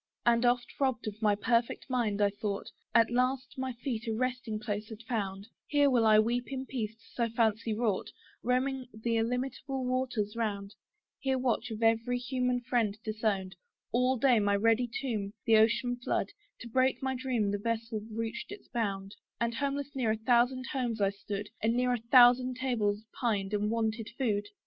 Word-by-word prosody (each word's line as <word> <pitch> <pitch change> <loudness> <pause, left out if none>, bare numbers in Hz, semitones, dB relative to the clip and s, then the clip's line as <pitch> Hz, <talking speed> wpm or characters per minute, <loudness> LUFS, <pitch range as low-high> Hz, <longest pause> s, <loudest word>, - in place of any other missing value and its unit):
And 235 0 +4
oft, 245 0 0
robb'd 260 -4 0
of 215 +1 -6
my 210 -2 +4
perfect 230 +3 0
mind, 230 -6 0
I 200 - +3
thought 205 0 -4 0.2
At 230 0 +5
last 255 +2 0
my 260 0 -2
feet 235 -1 -4
a 225 - 0
resting 250 -2 -2
place 210 0 -4
had 220 0 -9
found: 200 -4 -3 0.2
Here 285 -1 +4
will 235 -3 +4
I 215 0 +7
weep 240 +3 +2
in 265 0 -3
peace, 225 -5 -4 0.2
(so 235 -1 0
fancy 225 -1 +1
wrought,) 215 -4 0 0.3
Roaming 255 +1 0
the 230 +2 -1
illimitable 255 +3 -2
waters 250 -5 -1
round; 205 -3 -2 0.5
Here 265 -1 0
watch, 245 -1 0
of 220 0 -4
every 230 +2 +2
human 250 0 -1
friend 235 -4 0
disowned, 210 -4 -1 0.4
All 250 +2 +2
day, 245 -1 +4
my 205 -1 +2
ready 230 +4 +2
tomb 215 -7 -3
the 225 -1 +6
ocean 235 +3 +3
flood 245 - -1 0.3
To 240 - -7
break 260 +3 +1
my 265 0 0
dream 250 -5 0
the 205 - -1
vessel 230 0 -2
reached 230 - -4
its 410 -1 -9
bound: 195 -4 -2 0.2
And 235 0 0
homeless 280 +2 -2
near 255 -5 0
a 220 - +1
thousand 245 +3 +2
homes 245 -5 -1
I 195 -1 +3
stood, 200 +1 -5
And 225 +2 +2
near 250 0 +2
a 245 - -1
thousand 250 +1 +6
tables 220 -5 0
pined, 210 -5 -1
and 210 0 +1
wanted 225 0 -1
food. 210 -6 0
235 Hz, 180 wpm, -31 LUFS, 215-250 Hz, 0.5 s, I